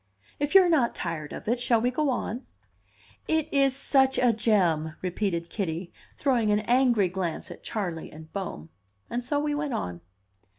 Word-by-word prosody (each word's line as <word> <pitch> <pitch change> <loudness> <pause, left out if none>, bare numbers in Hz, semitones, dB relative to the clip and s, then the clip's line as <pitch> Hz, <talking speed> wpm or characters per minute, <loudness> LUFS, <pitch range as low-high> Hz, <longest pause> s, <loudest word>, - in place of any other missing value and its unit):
If 290 +5 -1
you 385 - +10
are - - +2
not 290 -9 +2
tired 160 -3 -4
of - - -8
it, 240 +2 +1
shall 240 -1 +3
we 245 +2 +1
go 295 +2 0
on?" 245 -1 -3 0.8
"It 315 -1 +1
is 275 -2 +3
such 265 -1 +3
a 245 -2 +4
gem!" 175 -8 +1
repeated 180 -2 -2
Kitty, 175 -3 -3 0.2
throwing 245 -6 +1
an 210 0 +3
angry 240 -3 +3
glance 180 -2 -4
at - - -10
Charley 175 -7 -4
and 155 +1 -13
Bohm. 170 - -5 0.4
And 245 +1 -2
so 285 +4 0
we 295 0 0
went 290 -4 -2
on. 90 - -4
225 Hz, 175 wpm, -27 LUFS, 175-265 Hz, 0.8 s, you